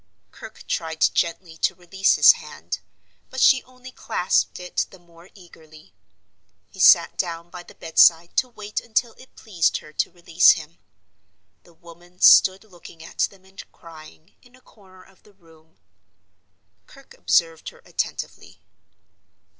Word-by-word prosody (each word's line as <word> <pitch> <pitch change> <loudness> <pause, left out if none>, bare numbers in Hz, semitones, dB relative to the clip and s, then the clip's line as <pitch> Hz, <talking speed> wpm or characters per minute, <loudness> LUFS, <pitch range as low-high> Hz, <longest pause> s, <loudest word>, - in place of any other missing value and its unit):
Kirke - - -14
tried 160 -1 -4
gently 170 -1 -3
to - - -1
release 190 +2 0
his - - +8
hand; - - -8 0.5
but 260 - -7
she 260 0 +4
only 255 0 -15
clasped 180 -7 -2
it 180 0 -3
the 190 - -16
more 170 0 -21
eagerly. 155 - -18 0.8
He - - -16
sat - - +5
down 170 0 -5
by 180 - -9
the - - -17
bedside 165 +1 +3
to 255 - +1
wait 210 -3 -6
until 230 +1 -2
it 260 - -18
pleased 180 -7 -1
her 155 - -15
to - - -2
release 175 0 +4
him. 165 0 -11 0.9
The 170 - -22
woman 175 +2 -18
stood 190 +1 +5
looking 175 -5 -16
at - - -15
them 190 -1 -22
and 190 +1 -13
crying, 160 0 -16
in 245 -1 -23
a 255 - -23
corner 190 -6 -21
of 190 0 -25
the 210 - -24
room. 160 -3 -25 1.1
Kirke 275 -2 -18
observed 165 -2 -1
her - - -21
attentively. - - -6
175 Hz, 145 wpm, -22 LUFS, 165-195 Hz, 1.1 s, his